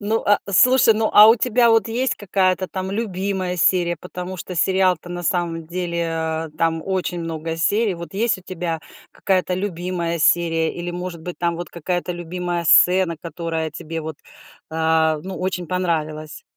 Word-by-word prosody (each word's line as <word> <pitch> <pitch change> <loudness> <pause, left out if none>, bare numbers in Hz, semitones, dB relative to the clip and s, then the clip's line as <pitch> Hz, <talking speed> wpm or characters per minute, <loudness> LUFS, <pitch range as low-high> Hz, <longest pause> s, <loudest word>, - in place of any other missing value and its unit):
ну, 215 +2 0
а 205 0 +5
слушай, 250 +4 +5
ну 220 0 +1
а 210 +1 +9
у 225 - +8
тебя 240 0 +3
вот 225 0 +3
есть 250 +4 0
какая-то 185 -2 0
там 190 0 -4
любимая 190 -3 -2
серия, 175 0 +2
потому 180 +2 -7
что 180 +2 -7
сериал-то, 185 0 +1
на 175 0 -5
самом 170 -1 -1
деле, 170 0 -2
а, 160 0 -2
там 165 -1 +1
очень 185 -2 -2
много 165 0 -4
серий. 205 +4 +1
Вот 170 0 -9
есть 225 +3 +1
у - - -15
тебя 170 -3 -4 0.3
какая-то 185 -1 0
любимая 175 -2 -3
серия 165 0 +2
или, 175 0 -4
может 175 -1 -6
быть, 180 +1 -7
там 170 -1 0
вот 175 - -6
какая-то 175 +1 -3
любимая 175 0 -4
сцена, 180 +2 +5
которая 165 -1 -4
тебе 160 +2 -6
вот, 155 -1 -6 0.5
а, 160 -1 +2
ну 190 0 -6
очень 180 -1 -3
понравилась? 155 -3 -3
175 Hz, 165 wpm, -21 LUFS, 165-190 Hz, 0.5 s, а